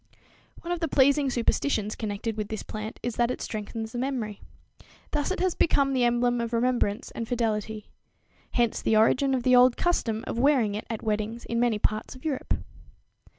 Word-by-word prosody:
One 340 - -4
of 350 - -1
the 330 - 0
pleasing 280 0 +4
superstitions 230 -3 0
connected 215 0 -3
with 210 -1 -3
this 220 0 -5
plant 215 0 -6
is 240 -2 -3
that 240 0 +2
it 250 - -3
strengthens 220 0 -5
the 240 - -4
memory. 245 -6 -3 0.7
Thus 295 -1 0
it 375 - -2
has 370 -2 +2
become 275 -4 +2
the 250 -2 +3
emblem 240 0 +2
of 235 0 -4
remembrance 235 -2 0
and 230 - -5
fidelity. 220 -3 -2 0.6
Hence 235 -2 +1
the 220 - +3
origin 265 +5 +3
of 250 - -2
the 255 0 +5
old 250 0 +6
custom 230 -11 0
of 230 - -3
wearing 255 -6 +3
it 210 - -5
at 225 -2 -4
weddings 215 +2 -2
in 235 - -1
many 240 -3 +2
parts 215 +4 -1
of 255 - -14
Europe. 280 -4 -1
235 Hz, 190 wpm, -27 LUFS, 220-260 Hz, 0.7 s, old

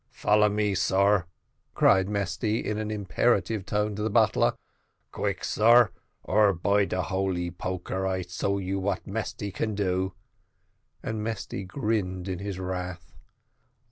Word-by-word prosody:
Follow 105 0 +3
me, 105 -1 0
sar," 95 -1 +2 0.5
cried 95 0 +4
Mesty, 100 +2 -1
in 105 0 -2
an 110 0 -3
imperative 105 -1 0
tone 105 0 0
to 105 - -4
the 110 - 0
butler; 100 - +3 0.6
"quick, - - -2
sar, 115 +2 +5 0.3
or 105 -2 +4
by 100 +4 +2
de 90 -1 -2
holy 95 -2 -1
poker, 95 +1 -3
I 95 -1 -1
show 95 +2 -2
you 95 0 -2
what 95 0 -2
Mesty 105 -1 -4
can 110 +2 -2
do;" 95 -1 0 0.9
and 110 -1 -3
Mesty 100 -3 -4
grinned 95 -4 -2
in 90 -2 -3
his 100 -1 -4
wrath. 90 -2 -5
100 Hz, 140 wpm, -27 LUFS, 95-105 Hz, 0.9 s, sar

